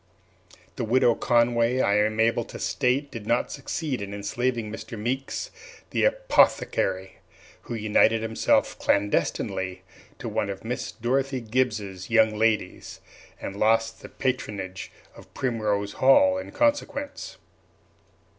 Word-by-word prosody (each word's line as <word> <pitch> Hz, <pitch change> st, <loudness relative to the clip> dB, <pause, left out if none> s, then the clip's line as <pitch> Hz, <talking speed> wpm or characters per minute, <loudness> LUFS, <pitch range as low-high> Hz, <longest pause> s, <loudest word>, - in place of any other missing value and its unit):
The -, -, -2 dB
Widow 120 Hz, +1 st, +4 dB
Conway, 120 Hz, +1 st, +2 dB
I 100 Hz, -4 st, +3 dB
am 110 Hz, +1 st, +1 dB
able 115 Hz, +1 st, +3 dB
to -, -, -9 dB
state, 135 Hz, +2 st, 0 dB
did 110 Hz, -3 st, -8 dB
not 120 Hz, -, +1 dB
succeed 140 Hz, -2 st, -3 dB
in 100 Hz, 0 st, -5 dB
enslaving 115 Hz, +2 st, -2 dB
Mr. 110 Hz, +1 st, -7 dB
Meeks, 130 Hz, -, -3 dB, 0.4 s
the -, -, +2 dB
apothecary, 95 Hz, -, +1 dB, 0.5 s
who 120 Hz, -, -5 dB
united 110 Hz, +1 st, +3 dB
himself 115 Hz, 0 st, +1 dB
clandestinely 95 Hz, -2 st, 0 dB, 0.3 s
to -, -, -6 dB
one 100 Hz, -, -1 dB
of 100 Hz, +2 st, -6 dB
Miss 125 Hz, +2 st, -3 dB
Dorothy 130 Hz, +3 st, -1 dB
Gibbs's 110 Hz, -6 st, -2 dB
young 110 Hz, -2 st, +4 dB
ladies, 110 Hz, 0 st, -1 dB, 0.4 s
and 100 Hz, -, -6 dB
lost 115 Hz, +2 st, +1 dB
the -, -, -10 dB
patronage 100 Hz, -8 st, -3 dB, 0.2 s
of -, -, -15 dB
Primrose 105 Hz, -5 st, -1 dB
Hall 280 Hz, -, +5 dB
in -, -, -8 dB
consequence. 290 Hz, +7 st, -1 dB
115 Hz, 125 wpm, -25 LUFS, 105-130 Hz, 0.5 s, Hall